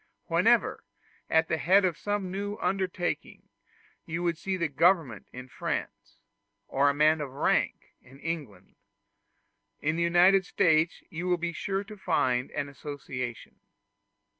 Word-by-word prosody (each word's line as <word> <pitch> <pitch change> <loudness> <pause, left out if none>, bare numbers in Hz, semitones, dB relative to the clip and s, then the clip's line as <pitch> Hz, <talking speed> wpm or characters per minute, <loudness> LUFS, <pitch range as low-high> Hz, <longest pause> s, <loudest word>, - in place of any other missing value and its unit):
Wherever, - - +2 0.5
at 160 0 +3
the 160 - -1
head 190 +4 +4
of 175 -3 +1
some 205 0 -3
new 205 +2 -3
undertaking, 185 -2 -2 0.6
you 170 +1 -1
see 185 +3 -3
the 170 -2 0
government 150 - +2
in 125 +1 -9
France, - - -5 0.5
or 140 +1 +3
a - - +1
man 155 +1 +4
of 145 - -4
rank 135 - 0
in 130 +2 -17
England, 140 - -6 1.1
in 155 +2 -1
the - - 0
United 175 +3 +5
States 165 -2 +2
you 175 +1 -4
will 180 -1 +2
be 170 0 -3
sure 195 +4 -2
to 210 +1 -11
find 130 -9 +1
an 145 - -3
association. 135 -4 -7
165 Hz, 140 wpm, -28 LUFS, 140-185 Hz, 1.1 s, United